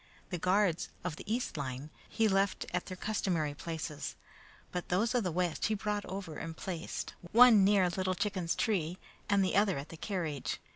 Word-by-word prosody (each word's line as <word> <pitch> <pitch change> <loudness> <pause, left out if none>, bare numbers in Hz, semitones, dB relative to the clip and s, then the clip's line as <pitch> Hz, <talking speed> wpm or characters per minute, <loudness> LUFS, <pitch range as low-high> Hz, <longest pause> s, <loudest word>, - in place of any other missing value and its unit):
The 180 - -2
guards 185 -1 +2
of 175 -3 -2
the 205 - -7
east 235 -7 -1
line 135 +1 -4 0.2
he 225 -1 +2
left 195 -1 +1
at 180 - -1
their 185 - -6
customary 175 -8 0
places, 155 -1 -5 0.6
but 180 -1 -4
those 210 +5 +2
of 245 -3 +2
the 180 - -1
west 175 -1 0
he 215 - +1
brought 210 0 -2
over 185 -5 -5
and 165 -1 -6
placed, 175 -3 -4 0.2
one 230 -3 +8
near 195 -2 +5
Little 185 +1 -1
Chicken's 185 -3 -1
tree, 180 -5 0 0.3
and 200 -2 +4
the 185 - 0
other 200 -3 +3
at 140 +2 -6
the 165 - -9
carriage. 160 -7 -3
185 Hz, 185 wpm, -32 LUFS, 165-205 Hz, 0.6 s, one